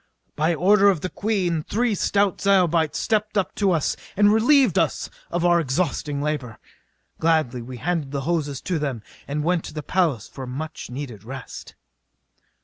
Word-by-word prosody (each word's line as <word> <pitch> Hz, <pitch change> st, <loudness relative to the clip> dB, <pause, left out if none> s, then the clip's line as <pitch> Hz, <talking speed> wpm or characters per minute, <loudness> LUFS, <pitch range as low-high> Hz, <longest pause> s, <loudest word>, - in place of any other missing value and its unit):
By 160 Hz, +3 st, +1 dB
order 200 Hz, +4 st, +5 dB
of 185 Hz, -6 st, +1 dB
the 185 Hz, -, -4 dB
Queen 185 Hz, -6 st, 0 dB
three 230 Hz, +7 st, 0 dB
stout 200 Hz, 0 st, +1 dB
Zyobites 175 Hz, -5 st, +3 dB
stepped 215 Hz, -1 st, 0 dB
up 195 Hz, -, 0 dB
to 200 Hz, -2 st, +1 dB
us 160 Hz, -4 st, +1 dB, 0.2 s
and 205 Hz, 0 st, +5 dB
relieved 245 Hz, -, +4 dB
us -, -, -1 dB, 0.2 s
of 175 Hz, 0 st, -1 dB
our 175 Hz, -1 st, +5 dB
exhausting 145 Hz, -1 st, -1 dB
labor. 140 Hz, -7 st, -3 dB, 0.6 s
Gladly 155 Hz, -7 st, +1 dB
we 125 Hz, +2 st, -8 dB
handed 165 Hz, 0 st, -2 dB
the 140 Hz, 0 st, -3 dB
hoses 150 Hz, -3 st, -2 dB
to 180 Hz, -4 st, -2 dB
them 135 Hz, -7 st, -3 dB, 0.2 s
and 150 Hz, +1 st, -2 dB
went 175 Hz, 0 st, +1 dB
to -, -, -9 dB
the 150 Hz, -, -4 dB
palace 155 Hz, -, 0 dB
for 135 Hz, -, -8 dB
a -, -, -10 dB
much 155 Hz, +5 st, -6 dB
needed 125 Hz, -5 st, -7 dB
rest. 130 Hz, +3 st, -9 dB
165 Hz, 170 wpm, -23 LUFS, 140-190 Hz, 0.6 s, order